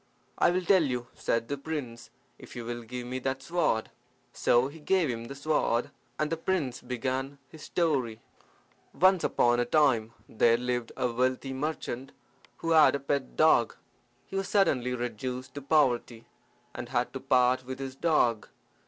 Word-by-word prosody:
"I - - +5
will 180 +1 0
tell 190 0 +5
you," 125 -5 -1
said 115 0 -1
the 140 +1 -4
prince, 125 -6 -6 0.3
"if - - -12
you 120 -1 -6
will 120 0 -4
give 120 +2 -7
me 130 +1 -4
that 135 +1 -3
sword." 160 -10 0 0.4
So 120 +2 +3
he 150 +3 -11
gave 165 -2 +1
him 115 -1 -5
the 140 - -8
sword, 140 -5 0 0.3
and 155 0 -1
the 165 - 0
prince 165 -7 -2
began 130 +3 -3
his 160 - -13
story: 135 -12 0 0.8
"Once 185 -1 +5
upon 120 0 +2
a 120 - +2
time 120 -6 +2
there 115 +1 +3
lived 125 -1 -2
a 125 - 0
wealthy 130 +2 -1
merchant 135 -2 -4 0.5
who 165 - +1
had 155 -3 +6
a - - -2
pet 140 - -2
dog. - - +4 0.5
He - - -9
was 195 -1 -1
suddenly 130 - +2
reduced 125 +2 -5
to 145 - -6
poverty, 130 -5 +1 0.5
and - - -7
had - - -1
to - - -4
part 125 0 +3
with 130 +1 -6
his 135 -1 -6
dog. 135 -8 +1
130 Hz, 170 wpm, -29 LUFS, 120-150 Hz, 0.8 s, had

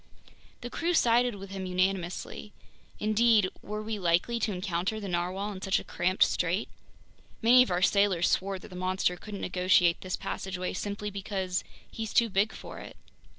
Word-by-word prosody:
The 245 - -6
crew 345 +1 0
sided 240 -3 +3
with 195 -1 -9
him 190 -1 -4
unanimously. 185 +2 -2 0.5
Indeed, 215 -2 +3
were 210 +1 -5
we 215 -1 -3
likely 180 +7 +1
to 215 -1 0
encounter 185 +2 -2
the 205 - -5
narwhale 185 +3 -2
in 190 -2 -8
such 195 -1 +1
a - - -4
cramped 185 +2 +2
strait? 180 +4 0 0.8
Many 245 +2 +8
of 250 - +3
our 180 0 0
sailors 195 -4 +3
swore 195 +1 0
that 185 - -12
the 180 - -10
monster 185 0 0
couldn't 205 +2 -8
negotiate 180 -1 +3
this 185 -1 -3
passageway 185 -1 -4
simply 205 +2 -4
because 190 -2 -3 0.3
"he's 220 -1 -5
too 235 -1 +5
big 200 +2 +2
for - - -9
it!" - - -11
195 Hz, 170 wpm, -29 LUFS, 185-215 Hz, 0.8 s, Many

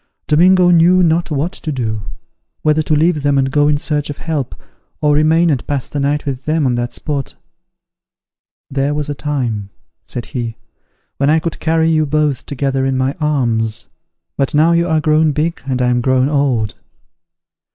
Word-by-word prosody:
Domingo 180 +3 +4
knew 175 +2 +5
not 170 +1 +1
what 150 +3 -1
to 160 -5 -5
do; 110 -6 -3 0.6
whether 155 0 +3
to 155 0 0
leave 155 0 +2
them 140 0 +1
and 135 -1 +1
go 145 +1 +3
in 150 -1 +3
search 150 0 -2
of 145 - -5
help, 155 -6 -3 0.4
or 150 -1 +2
remain 160 +3 +3
and 130 -4 -2
pass 140 -3 -2
the 145 - -4
night 145 +2 0
with 135 -2 -4
them 155 -1 +1
on 125 - +2
that 120 0 -2
spot. 140 -3 -4 1.3
"There 140 +1 -1
was 150 0 -3
a - - -1
time," 125 -9 -3 0.4
said 120 - -5
he, 115 -3 -5 0.6
"when 140 +1 +1
I 155 - +4
could 165 +1 -3
carry 160 0 +1
you 155 -1 +2
both 150 -2 0
together 135 -1 -1
in 135 0 0
my 130 +1 0
arms! 115 -7 -1 0.5
But 140 +2 0
now 160 +3 +4
you 170 +1 +2
are 160 -2 +2
grown 155 0 +2
big, 160 +4 -1
and 130 -1 -1
I 125 - +2
am 125 0 +1
grown 130 +2 +2
old." 130 -9 0
145 Hz, 185 wpm, -16 LUFS, 130-155 Hz, 1.3 s, knew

